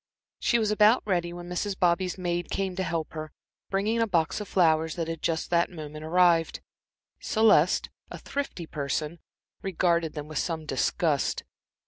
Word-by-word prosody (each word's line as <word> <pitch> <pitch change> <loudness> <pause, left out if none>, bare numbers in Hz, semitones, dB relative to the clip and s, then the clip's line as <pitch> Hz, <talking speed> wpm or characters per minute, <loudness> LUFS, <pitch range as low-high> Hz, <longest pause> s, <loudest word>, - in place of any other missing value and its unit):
She 235 - +2
was 215 -2 +1
about 210 +3 +5
ready 175 -4 0
when 175 0 -8
Mrs. 185 +2 -2
Bobby's 180 +1 +1
maid 175 -1 -2
came 190 -2 -2
to 190 - -2
help 165 -3 -2
her, 155 -1 -6 0.4
bringing 210 +4 0
a 225 - +2
box 170 0 0
of 210 - -6
flowers 160 -3 +2
that 165 -2 -3
had 165 -1 -5
just 160 0 -1
that 170 0 +3
moment 155 -3 -8
arrived. 170 0 +3 0.6
Celeste, 210 -7 +3 0.2
a - - -7
thrifty 280 -11 -4
person, 150 +2 -3 0.4
regarded 170 -4 +1
them 150 -1 -6
with 155 -2 -3
some 160 -2 -2
disgust. 145 +1 0
175 Hz, 160 wpm, -27 LUFS, 160-190 Hz, 0.6 s, about